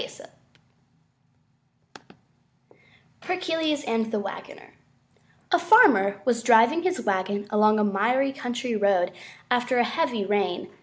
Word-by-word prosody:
_ - - -11 2.9
HERCULES 325 -5 -2
AND 225 -3 -2
THE 215 - -1
WAGONER 195 -1 -9 0.8
A 355 - +3
Farmer 200 - +4
was 235 -2 0
driving 235 +7 +4
his 370 0 -2
wagon 200 +1 -2
along 215 0 +3
a 210 - +1
miry 235 +7 0
country 245 -3 -4
road 195 -3 +1 0.4
after 245 +1 0
a 240 - +3
heavy 240 -7 -2
rain. 195 -3 -2
235 Hz, 110 wpm, -24 LUFS, 205-285 Hz, 2.9 s, Farmer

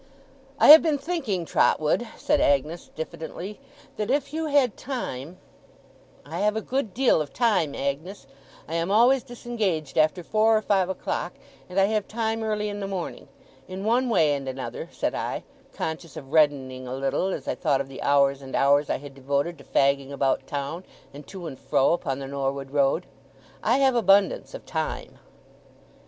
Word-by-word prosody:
'I - - +5
have 310 +1 +12
been 310 -3 +1
thinking, 275 - -2
Trotwood,' 155 +9 +2
said 300 0 +1
Agnes, 150 +5 +1
diffidently, 170 - -6 0.4
'that 210 +1 -2
if 280 +1 0
you 320 0 -2
had 280 -6 +3
time 180 - -5 0.4
' - - -29
'I - - -5
have 210 +1 +2
a 220 - -1
good 260 -5 -2
deal 245 -7 +3
of 150 - -5
time, 195 - +1
Agnes. 140 +6 -4 0.4
I 160 - -7
am 165 +2 -1
always 245 +6 +5
disengaged 205 - -3
after 155 +3 +2
four 220 +3 +3
or - - 0
five 190 -3 +2
o'clock, 180 -1 -3 0.4
and 180 +2 0
I 195 - +5
have 210 0 -1
time 225 0 -2
early 210 -1 -1
in 205 0 -4
the 195 - -3
morning. 190 -3 -5 0.4
In 190 +2 -6
one 245 +3 +2
way 155 -10 +3
and 135 -2 -3
another,' 130 0 -6
said - - -2
I, - - -3 0.3
conscious 160 0 -5
of 135 +1 -10
reddening 135 -5 +2
a 125 - -4
little 135 +7 0
as 190 - -4
I - - 0
thought 145 -6 +1
of 135 - -3
the 135 -1 -9
hours 140 -1 +3
and 135 -1 -7
hours 145 +1 +3
I - - +1
had 140 +1 -11
devoted 140 +5 -2
to - - -13
fagging 140 0 +1
about 135 -1 0
town, 145 +5 -4 0.3
and 145 +1 -11
to 190 -3 -8
and 135 -5 -7
fro 135 - +2
upon 135 -6 -2
the 140 - -6
Norwood 135 0 -3
Road, 140 -2 +2 0.6
'I 235 +4 +2
have 270 -1 +4
abundance 205 - +3
of - - -10
time. - - -4
175 Hz, 180 wpm, -25 LUFS, 140-220 Hz, 0.6 s, have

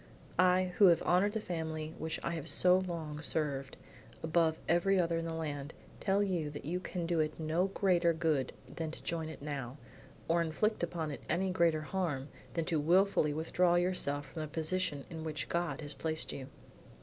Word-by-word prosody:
"I, 185 0 +4
who 200 - +9
have 170 -2 +5
honored 190 +4 +3
the 220 - 0
family 160 -4 -4
which 160 0 -2
I - - -1
have 165 -4 -4
so 180 0 +5
long 165 -5 -4
served, 140 -4 -1 0.5
above 160 0 +2
every 185 +3 +3
other 170 -1 +1
in 165 - -3
the 165 - -3
land, 150 -2 -4 0.2
tell 200 0 +2
you 175 -6 -1
that 145 -1 -8
you 175 +4 -1
can 180 -1 -4
do 170 -1 +1
it 155 0 0
no 160 +4 +1
greater 180 -3 +3
good 155 -5 +1
than 160 -1 -5
to 155 - -10
join 160 -2 -2
it 160 - -9
now, 140 -3 -4 0.5
or 170 +1 +3
inflict 170 +7 0
upon 165 -2 -2
it 140 - -6
any 185 +3 +1
greater 170 -4 +3
harm 150 -5 -2 0.3
than 165 -2 0
to 165 -3 +1
wilfully 175 0 +4
withdraw 170 +3 +2
yourself 175 -5 0
from 150 +3 -7
the 155 - -3
position 155 -2 -2
in 160 -1 -5
which 155 -3 -4
God 170 -1 -1
has 145 -1 -3
placed 155 +3 -3
you." 130 -2 -6
165 Hz, 190 wpm, -33 LUFS, 155-180 Hz, 0.5 s, who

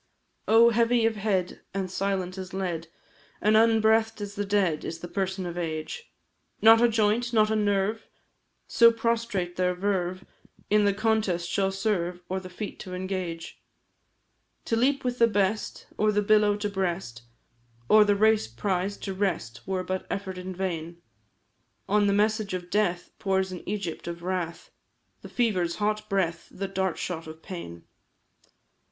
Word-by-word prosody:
Oh! 230 +2 +6
heavy 235 0 +3
of 225 -1 +1
head, 195 -4 -1
and 190 -2 -2
silent 190 -1 -1
as 190 -1 -7
lead, 175 -4 -3 0.5
And 215 +1 +3
unbreathed 225 0 +4
as 205 -1 -5
the 205 0 -3
dead, 190 -6 +1
is 165 - -4
the 175 - -8
person 190 0 -2
of 175 0 -4
Age; 160 - -5 0.5
Not 225 +1 +7
a 240 - +5
joint, 225 +2 +1
not 215 -1 +4
a - - +2
nerve 205 +1 0 0.6
so 230 0 +6
prostrate 230 -6 -1
their 180 0 +1
verve 185 -1 -1 0.5
In 210 0 +5
the 200 - +3
contest 210 -5 0
shall 195 +1 0
serve, 180 -3 -1
or 190 +1 -1
the 185 -1 -10
feat 200 +3 -7
to 180 -1 -7
engage. 180 -3 -5 1.0
To 230 - 0
leap 270 +4 +2
with 250 -1 -2
the 230 - +6
best, 205 0 -1
or 215 0 +3
the 210 0 +1
billow 210 0 +4
to 210 0 -2
breast, 185 - -3 0.7
Or 215 - +7
the 205 -1 +3
race 215 - +3
prize 185 - -2
to 195 - -5
wrest, 175 - -3
were 190 -1 -1
but 185 0 -4
effort 190 -2 -4
in 185 0 -6
vain; 170 -2 -4 0.9
On 205 0 +3
the - - +3
message 210 -1 +1
of 180 -1 -7
death 180 -4 0
pours 190 -1 0
an 180 - -6
Egypt 200 -6 -4
of 170 0 -6
wrath, 175 -3 -3 0.5
The - - -10
fever's 185 -8 0
hot 210 0 -1
breath, 170 -4 -1
the 195 +1 -5
dart 190 -2 -1
shot 165 -3 -4
of 160 +1 -11
pain. 85 - -8
195 Hz, 160 wpm, -27 LUFS, 180-215 Hz, 1.0 s, Not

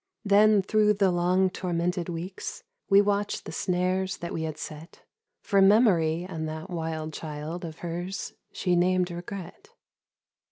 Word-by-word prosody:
Then 205 0 +5
through 210 +1 +3
the 195 -2 +3
long 180 +2 +2
tormented 175 0 -2
weeks 180 - -6 0.3
We 200 0 +7
watched 205 0 -1
the - - -6
snares 185 0 0
that 170 - -6
we 165 - -3
had 155 -1 -4
set 155 +2 -9 0.4
For 200 -2 +3
Memory 185 -6 +4
and 160 -4 -4
that 160 +4 -7
wild 160 -2 -3
child 155 +3 -6
Of 160 -2 -8
her's 175 +3 -4 0.2
she 180 -2 0
named 180 0 +2
Regret. 185 - -8
180 Hz, 145 wpm, -27 LUFS, 165-195 Hz, 0.4 s, We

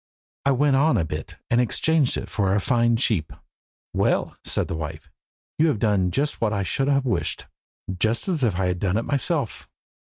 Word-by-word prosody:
"I - - +5
went 140 +1 +3
on 140 -2 +3
a 85 - +1
bit, - - -6 0.2
and 120 +1 +4
exchanged 150 +3 +2
it - - -5
for 100 -2 0
a - - +3
fine 120 +2 +2
sheep." 110 - 0 0.6
"Well," - - +1
said - - -1
the - - -4
wife, 80 0 -6 0.5
"you 160 - +5
have 150 - +1
done 100 -4 +2
just 145 +11 -1
what 110 -2 +2
I 100 -2 -1
should 135 +9 -1
have 140 -1 +2
wished 125 - -1 0.5
just 110 - 0
as 175 -6 0
if 110 -7 +1
I 95 - +1
had 90 -1 -1
done 95 +1 0
it 115 - -1
myself. 140 -2 -1
115 Hz, 195 wpm, -24 LUFS, 95-140 Hz, 0.6 s, I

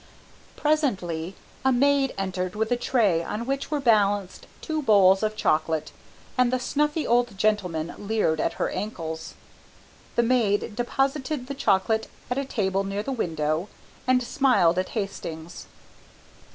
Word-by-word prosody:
Presently 195 - 0 0.3
a 265 - +4
maid 275 +1 +3
entered 185 -1 -3
with 220 +2 -1
a - - +4
tray 215 -9 +2
on 215 +6 -4
which 275 +1 -2
were 300 -1 0
balanced 205 -6 +1
two 315 -1 -2
bowls 195 -6 +5
of 215 0 -1
chocolate, 155 -5 0 0.5
and 250 -1 +4
the 255 - +1
snuffy 300 +4 0
old 240 -3 +1
gentlemen 180 -6 0
leered 205 -7 0
at - - 0
her - - -2
ankles. 160 -6 -5 0.8
The 235 - +3
maid 220 -4 +1
deposited 270 +3 -1
the 280 - -5
chocolate 220 -3 +1 0.2
at 250 - +1
a 275 - -2
table 195 -6 0
near 195 +1 -3
the 275 - -3
window 160 - -1 0.4
and 255 -1 +3
smiled 240 - +3
at 185 - -2
Hastings. 175 -5 -5
215 Hz, 140 wpm, -25 LUFS, 185-255 Hz, 0.8 s, bowls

